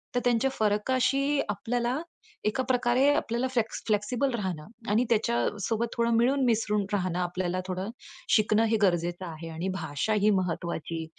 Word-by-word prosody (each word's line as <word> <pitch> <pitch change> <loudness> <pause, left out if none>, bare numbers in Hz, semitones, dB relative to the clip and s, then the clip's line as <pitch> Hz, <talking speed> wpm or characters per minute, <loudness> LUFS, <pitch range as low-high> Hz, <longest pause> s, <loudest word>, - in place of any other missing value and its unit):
तर - - +4
त्यांच्या 245 +2 +2
फरकाशी 260 +6 +1
आपल्याला 240 +6 -1 0.5
एका 260 +5 +1
प्रकारे 250 +1 +2
आपल्याला 250 -3 0
फ्लॅक्स 230 -3 -1
फ्लेक्सिबल 225 +6 +1
राहणं 185 -8 -3 0.2
आणि 215 +4 +3
त्याच्यासोबत 225 0 0
थोडं 235 0 +1
मिळून 265 +4 +3
मिसळून 210 -3 +1
राहणं, 185 -3 0
आपल्याला 180 0 -1
थोडं 185 +2 -3 0.5
शिकणं 215 0 +3
हे 225 0 +2
गरजेचं 175 -1 +1
आहे 165 -1 -7
आणि 165 +3 -4
भाषा 145 +3 -2
ही 210 - +5
महत्वाची 165 -2 -3
215 Hz, 140 wpm, -28 LUFS, 185-240 Hz, 0.5 s, ही